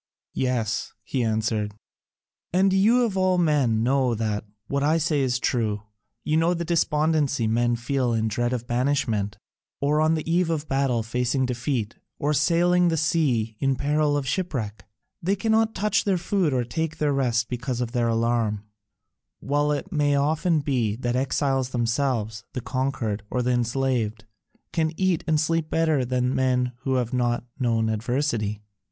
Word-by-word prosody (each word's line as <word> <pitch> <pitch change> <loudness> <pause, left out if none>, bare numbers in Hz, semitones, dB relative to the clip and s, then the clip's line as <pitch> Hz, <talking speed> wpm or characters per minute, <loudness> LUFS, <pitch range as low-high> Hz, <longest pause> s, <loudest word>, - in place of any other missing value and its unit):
"Yes," 120 -4 -1
he 120 +3 -1
answered, 110 -2 -1 0.8
"and 190 +2 +3
you 225 +6 +4
of 210 -4 -3
all 185 -1 +2
men 140 -10 +2
know 130 -1 +2
that 105 -1 -2 0.2
what 140 +4 -1
I 155 +3 +3
say 155 -3 +1
is 125 -2 +1
true: 110 -5 -1 0.4
you 155 - +1
know 170 +2 +2
the 170 0 -3
despondency 155 -5 +1
men 120 +2 +2
feel 125 +1 -1
in 110 -1 +1
dread 120 +3 -1
of 120 -2 -3
banishment, 120 -5 0 0.4
or 150 +2 +2
on 160 +1 +3
the 155 - -4
eve 170 +1 +2
of 155 -2 -2
battle 135 -4 +1
facing 125 +3 0
defeat, 120 -2 -2 0.2
or 150 +1 0
sailing 175 +4 +3
the 165 -1 +1
sea 140 -9 +1
in 135 -1 +1
peril 145 +2 +1
of 140 -2 -3
shipwreck 130 - -3 0.4
they 190 +4 +1
cannot 220 +2 +1
touch 210 0 +1
their 195 -3 +1
food 175 -2 0
or 125 -2 +1
take 160 +6 -3
their 150 -2 +1
rest 120 -3 +1
because 125 0 -3
of 120 -2 -2
their 120 -2 +1
alarm: 115 -2 0 0.8
while 145 +1 0
it 160 +7 -3
may 145 -3 +2
often 155 +3 +1
be 125 -7 0
that 120 +1 -2
the 125 - +1
exiles 135 -1 0
themselves, 115 -3 -1
the 125 - -3
conquered, 130 -5 -2
or 125 - -1
the 125 - +1
enslaved, 120 -3 0 0.5
can 160 -2 +1
eat 185 -4 +1
and 155 -1 +2
sleep 160 0 0
better 160 -4 +2
than 125 +1 0
men 125 -1 +1
who 130 0 -1
have 125 -2 -1
not 120 -1 0 0.2
known 115 -3 +1
adversity. 110 -2 -1
130 Hz, 165 wpm, -25 LUFS, 120-155 Hz, 0.8 s, you